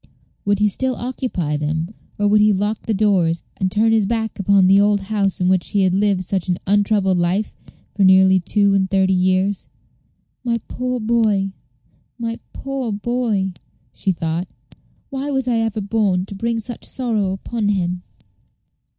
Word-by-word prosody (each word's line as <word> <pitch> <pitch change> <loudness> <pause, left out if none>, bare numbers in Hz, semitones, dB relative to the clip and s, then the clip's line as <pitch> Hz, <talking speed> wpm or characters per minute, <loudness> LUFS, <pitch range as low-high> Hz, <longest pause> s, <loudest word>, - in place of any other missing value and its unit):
Would 205 0 +2
he 210 +1 +3
still 255 +5 -1
occupy 235 - -3
them, 160 +5 -2 0.2
or 205 - +1
would 210 +1 +4
he 210 0 +5
lock 205 +3 -2
the 225 - +1
doors, 185 -5 +2
and 190 - 0
turn 220 +3 +3
his 220 -3 +2
back 220 -1 -2
upon 195 0 +4
the 195 +2 +5
old 205 0 +3
house 195 -1 -1
in 180 - +1
which 185 -1 +2
he 200 -1 +2
had 185 -1 +2
lived 195 -1 +1
such 185 0 -2
an 180 - +1
untroubled 200 -2 +2
life 180 +5 0 0.4
for 200 - +1
nearly 190 0 +6
two 200 +3 +2
and 190 -1 +1
thirty 190 0 +2
years? 185 +2 +1 0.8
"My 235 -2 0
poor 250 0 -3
boy, 215 -4 +1 0.7
my 230 -1 -4
poor 270 -4 -4
boy!" 210 -3 -1 0.4
she 195 - -1
thought. 165 +1 -2 0.6
"Why 275 +1 -3
was 265 -2 -1
I 240 -2 +2
ever 225 -1 -1
born 200 -3 0
to 200 - -9
bring 230 +3 -1
such 240 +2 -7
sorrow 220 -7 -1
upon 215 +2 -3
him?" 180 -3 0
200 Hz, 170 wpm, -20 LUFS, 190-225 Hz, 0.8 s, nearly